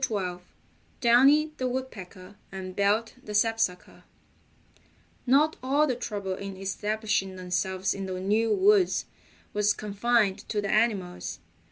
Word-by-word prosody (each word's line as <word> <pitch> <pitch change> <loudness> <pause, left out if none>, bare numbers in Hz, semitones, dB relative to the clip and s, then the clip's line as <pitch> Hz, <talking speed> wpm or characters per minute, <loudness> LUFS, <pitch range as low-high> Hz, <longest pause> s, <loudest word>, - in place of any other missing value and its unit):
STORY 210 -6 0 0.2
XII - - -26 0.6
DOWNY 275 +6 +5
THE 255 - -1
WOODPECKER 205 -8 -7 0.2
AND 185 -1 -7
BELT 210 +3 +1
THE 210 - -6
SAPSUCKER 225 -4 0 1.2
Not 295 +5 +4
all 280 +4 +2
the 260 -4 -1
trouble 205 -5 -4
in 195 0 -7
establishing 205 0 -2
themselves 185 +1 -1
in 195 -1 -5
the 185 -1 -4
new 215 +4 +1
woods 390 - +3 0.5
was 210 0 +2
confined 210 -1 +1
to 210 - -1
the 200 -1 -2
animals. 190 - 0
210 Hz, 130 wpm, -27 LUFS, 190-240 Hz, 1.2 s, DOWNY